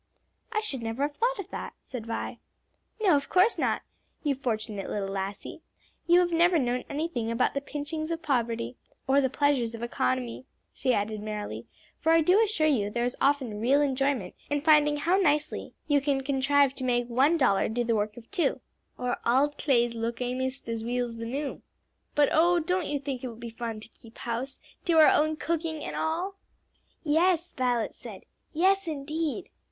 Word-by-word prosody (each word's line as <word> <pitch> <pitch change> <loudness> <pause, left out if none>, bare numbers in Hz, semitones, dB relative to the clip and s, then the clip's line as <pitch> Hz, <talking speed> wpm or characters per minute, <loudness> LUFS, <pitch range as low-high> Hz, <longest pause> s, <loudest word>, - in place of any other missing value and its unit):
"I 430 -2 0
should 275 - -3
never 225 +4 -2
have 290 0 -1
thought - - +1
of 395 -1 -7
that," - - -5
said 235 -4 -8
Vi. 230 - -4 0.6
"No, 370 -7 +6
of 280 - -1
course 375 +5 +4
not, - - 0 0.4
you 290 -2 +2
fortunate 220 -6 -3
little 200 -2 -2
lassie; 195 +1 -5 0.5
you 345 +1 +6
have 350 -1 0
never 345 +1 +4
known 250 -3 0
anything 285 -6 -2
about 230 +2 +1
the 280 - -1
pinchings 300 +2 -4
of 330 0 -3
poverty 235 -4 -1 0.3
or 275 +1 +4
the 265 - +1
pleasures 265 -4 +1
of 230 - -7
economy," 125 - -2 0.3
she 260 - 0
added 210 -1 -1
merrily, 210 -1 -5 0.3
"for 325 - +2
I 330 - +6
do 365 +7 +5
assure 405 -8 +1
you 240 -10 +2
there 235 +3 -1
is 245 - -2
often 265 -7 +1
real 265 +5 +4
enjoyment 270 -8 0 0.2
in 290 0 0
finding 295 -1 +5
how 340 +6 +2
nicely 300 -5 0
you 290 -2 +3
can 275 -1 +1
contrive 280 0 +3
to 265 - -5
make 245 -1 +1
one 265 +8 +3
dollar 250 -10 +3
do 240 +2 0
the 230 -1 +1
work 210 0 -1
of 230 -1 -13
two 345 - +1 0.4
or 250 0 -1
'auld 275 +5 +3
claes 240 -5 +2
look 230 0 -3
amaist 255 +1 -3
as 230 -1 -3
weel's 240 0 -2
the 230 - -5
new.' 275 +5 -4 0.5
But 290 -1 +4
oh, 345 +3 +4
don't 360 +1 -1
you 290 - -1
think 270 -3 -5
it - - -2
will 235 - -7
be 235 0 -8
fun 225 -1 -5
to - - -6
keep 230 0 -17
house, 245 +3 -4 0.2
do 335 -2 +2
our 310 - +8
own 310 +1 +3
cooking 320 -1 -2
and - - -5
all?" 355 +5 -2 0.7
"Yes," 335 +3 +2
Violet 245 -3 0
said; - - -10 0.3
"yes, 380 +3 +2
indeed." 310 +3 -3
275 Hz, 190 wpm, -28 LUFS, 235-310 Hz, 0.7 s, our